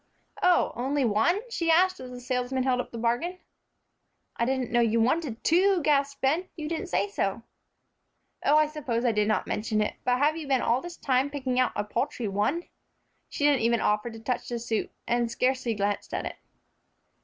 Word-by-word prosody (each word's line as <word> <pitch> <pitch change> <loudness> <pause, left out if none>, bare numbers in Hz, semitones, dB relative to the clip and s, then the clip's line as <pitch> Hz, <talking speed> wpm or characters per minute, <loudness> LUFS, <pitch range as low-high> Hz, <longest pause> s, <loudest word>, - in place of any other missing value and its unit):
"Oh, 360 -1 +4
only 270 +2 0
one?" 345 - +1
she 335 -6 -1
asked, 370 +3 +4
as 255 - -8
the 250 0 -8
salesman 250 +1 -1
held 255 -1 +1
up - - -10
the 235 - -7
bargain. 240 +11 -1 1.0
"I 235 - 0
didn't 260 -1 -1
know 240 - +3
you 230 -1 +3
wanted 250 0 0
two," 370 +3 +4
gasped 280 -1 +1
Ben; 320 +8 +1
"you 310 -2 -5
didn't 335 +5 -3
say 205 - 0
so." 200 +2 -2 1.0
"Oh, 295 +2 +5
I 305 - +5
suppose 265 -6 -3
I 240 - +4
did 210 -1 +1
not 215 - +1
mention 215 0 -1
it. 210 - 0
But 250 0 +2
have 295 +3 +2
you 320 -3 -6
been 265 -2 +2
all 240 +3 +2
this 350 -1 -8
time 260 +1 +1
picking 260 -3 -2
out 255 - +3
a 210 - 0
paltry 240 +2 -2
one?" 210 - 0 0.7
She 290 - -1
didn't 285 -3 +4
even 235 0 +2
offer 210 +3 +1
to 225 -1 -10
touch 245 +2 -3
the 240 - -2
suit, 230 -1 -2 0.2
and 240 0 +1
scarcely 250 -1 0
glanced 205 0 -2
at - - -3
it. - - -6
255 Hz, 200 wpm, -27 LUFS, 230-300 Hz, 1.0 s, Oh